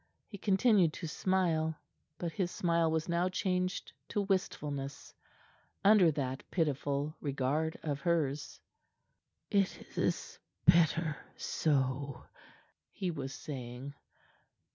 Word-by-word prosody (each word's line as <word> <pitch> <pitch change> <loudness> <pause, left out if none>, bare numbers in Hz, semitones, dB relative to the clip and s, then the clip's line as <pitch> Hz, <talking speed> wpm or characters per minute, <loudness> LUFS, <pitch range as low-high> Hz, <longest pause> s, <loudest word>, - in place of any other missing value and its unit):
He 200 - -10
continued 195 -4 +4
to 170 - -5
smile, 160 -2 +1 0.4
but 170 0 -3
his 175 +2 -1
smile 170 -2 +2
was 160 +1 0
now 175 +1 +1
changed 185 0 -1 0.2
to 205 - 0
wistfulness 145 -8 -2 0.7
under 200 -4 +7
that 135 -2 -2
pitiful 145 -2 0
regard 145 +3 0
of 145 -3 -2
hers. 150 -3 0 0.9
"It 200 -2 0
is - - -1 0.3
better 165 -2 +4 0.2
so," 140 -2 0 0.7
he 185 -2 -3
was 135 -4 -4
saying. 130 -1 -6
160 Hz, 100 wpm, -33 LUFS, 140-180 Hz, 0.9 s, under